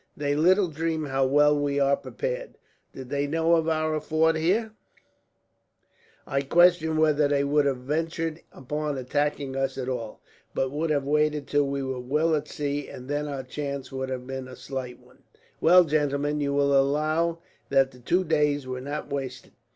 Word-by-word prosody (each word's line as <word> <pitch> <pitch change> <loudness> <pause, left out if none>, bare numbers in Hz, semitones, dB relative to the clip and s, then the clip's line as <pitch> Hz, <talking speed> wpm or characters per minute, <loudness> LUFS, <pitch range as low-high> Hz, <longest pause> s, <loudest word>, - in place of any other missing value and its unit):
They 145 -1 0
little 185 +5 +4
dream 160 0 -2
how 135 -1 +1
well 150 +2 +4
we 145 -1 0
are 140 0 +4
prepared. - - -5 0.3
Did 130 -2 -9
they 145 0 -1
know 165 +2 +2
of 165 -1 +2
our 155 -1 0
fort 160 +1 +2
here, 195 +8 +1 1.5
I 135 -1 0
question 165 +1 +4
whether 155 -2 +3
they 140 0 +1
would 145 0 +2
have 135 -2 0
ventured 160 +4 -3
upon 150 +2 -4
attacking 140 +1 -1
us 135 0 -1
at 130 -1 -4
all, 120 -4 -5 0.3
but 130 -1 0
would 155 +3 -2
have 145 -2 +1
waited 150 0 +1
till 145 0 +1
we 140 0 -2
were 130 -1 -3
well 150 +6 +1
at 150 -1 -1
sea, 145 -1 -3
and 125 - -10
then 145 +1 -2
our 140 -2 -4
chance 140 0 -5
would 130 0 -4
have 125 -1 -4
been 130 0 -6
a 130 - -10
slight 130 -2 -6
one. - - -23 0.4
"Well, 180 +2 +7
gentlemen, 145 -1 0
you 140 -1 0
will 140 0 +2
allow 155 +5 +2 0.3
that 135 -1 +3
the 125 - -16
two 180 +9 +1
days 150 -4 +1
were 130 0 -5
not 145 +2 -5
wasted. 130 -2 -5
145 Hz, 180 wpm, -26 LUFS, 135-155 Hz, 1.5 s, Well